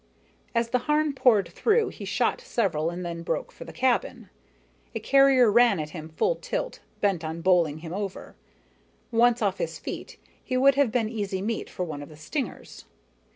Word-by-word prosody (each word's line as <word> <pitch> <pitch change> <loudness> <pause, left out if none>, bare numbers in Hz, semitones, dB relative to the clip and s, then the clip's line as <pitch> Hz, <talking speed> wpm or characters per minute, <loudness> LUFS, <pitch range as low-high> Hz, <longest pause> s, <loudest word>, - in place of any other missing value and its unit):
As 230 0 +1
the 250 - +2
Harn 300 -1 +2
poured 235 -7 +3
through, 450 0 +2
he - - -9
shot - - 0
several 195 - 0
and 175 +1 -5
then 170 -1 -5
broke 165 - -3
for - - -11
the - - -9
cabin. 260 - -1 0.6
A - - -1
carrier 270 -4 +5
ran 235 -4 +5
at 155 0 -4
him 155 -1 -8
full 325 - 0
tilt, - - -4 0.2
bent 195 -5 +1
on 160 +1 -4
bowling 165 -4 +2
him 165 - -6
over. 200 -1 -5 0.8
Once 240 +1 +3
off - - 0
his - - -3
feet, - - -7 0.3
he 255 - -1
would 275 +2 +6
have 275 -4 +2
been 230 -2 +1
easy 205 -4 -3
meat 225 +2 -3
for 180 - -4
one 150 -4 -6
of 145 - -9
the 155 - -13
stingers. 270 - -5
220 Hz, 185 wpm, -26 LUFS, 170-260 Hz, 0.8 s, would